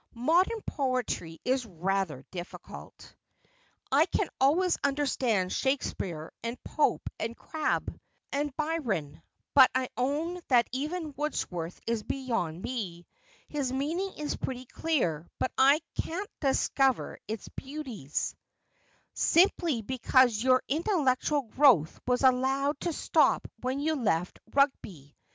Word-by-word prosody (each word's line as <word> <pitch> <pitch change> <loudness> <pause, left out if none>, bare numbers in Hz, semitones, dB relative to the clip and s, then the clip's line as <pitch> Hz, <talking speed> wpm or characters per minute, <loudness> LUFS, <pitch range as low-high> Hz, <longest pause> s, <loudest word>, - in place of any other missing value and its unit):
' - - -37
Modern 345 - +2
poetry 255 - -2
is 260 0 +1
rather 185 - -2
difficult. 175 -1 -9 0.8
I - - +5
can - - 0
always 335 +7 +4
understand 260 -9 +1
Shakespeare, 185 - -2
and 235 +2 -4
Pope, 305 - 0
and 230 +1 -3
Crabbe, 315 -1 -2 0.3
and 285 -1 -2
Byron, 225 - -2 0.3
but 265 -2 +8
I 260 -1 0
own 305 +8 -1
that 240 -3 +4
even 305 +4 -3
Wordsworth 180 - -3
is 230 -1 0
beyond 225 -11 -3
me. 180 -9 -4 0.4
His 280 -4 -2
meaning 325 +9 -1
is 300 -1 -2
pretty 255 -1 -5
clear, 175 - -1
but - - -1
I 280 +4 +5 0.2
can't 375 +5 -4
cliacover 270 -2 +1
his 220 0 -5
beauties.' 265 - -4 0.5
' - - -38
Simply 335 - +3
because 250 -1 +3
your 255 +1 +4
intellectual 295 -3 +1
growth 230 - +4
was 250 +1 +1
allowed 270 +3 +2
to 345 - -1
stop - - +2
when 255 +2 -2
you 310 +2 +1
left 180 - 0
Eug'oy. 195 - 0
260 Hz, 120 wpm, -29 LUFS, 215-295 Hz, 0.8 s, but